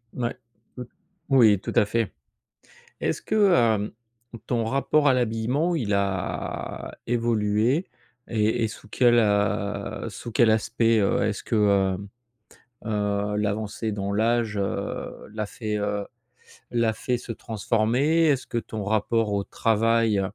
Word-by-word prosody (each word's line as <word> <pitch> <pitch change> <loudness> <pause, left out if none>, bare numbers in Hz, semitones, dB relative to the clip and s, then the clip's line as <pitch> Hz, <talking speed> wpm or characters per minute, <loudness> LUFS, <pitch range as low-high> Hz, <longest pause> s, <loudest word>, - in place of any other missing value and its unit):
Ouais. 120 -1 -2 0.4
Oui, 125 - -5 0.4
oui, 110 -7 +6
tout - - -5
à 105 - +5
fait. 115 0 -1 0.9
Est-ce - - -1
que, 210 -3 +3
hem, 110 -7 +2 0.6
ton 120 -2 0
rapport 140 +4 +2
à 130 - +6
l'habillement, 125 +8 0
il 105 -9 -1
a 100 -2 -3
évolué 115 - +1 0.4
et 110 0 +1
et - - +2
sous 110 - -11
quel, 120 +1 +4
heu, 105 -1 0
sous 120 - -8
quel 115 -2 +4
aspect, 115 +1 +2
heu? 100 - +2
Est-ce 105 -1 -2
que, 115 - -2
heu, 100 -3 +3 0.9
heu, 105 -1 -1
l'avancée 105 +1 -2
dans 100 0 -3
l'âge, 110 0 +1
heu, 100 - -4
l'a 105 -1 -2
fait, 105 -1 -4
heu, 105 0 -2 0.7
l'a 115 -2 +2
fait 125 +2 -2
se 115 - -7
transformer? 120 +9 +1
Est-ce 135 -3 +1
que 120 - -3
ton 110 -2 -4
rapport 110 +1 +1
au 100 -1 0
travail, 115 -2 +2
110 Hz, 135 wpm, -25 LUFS, 105-120 Hz, 0.9 s, oui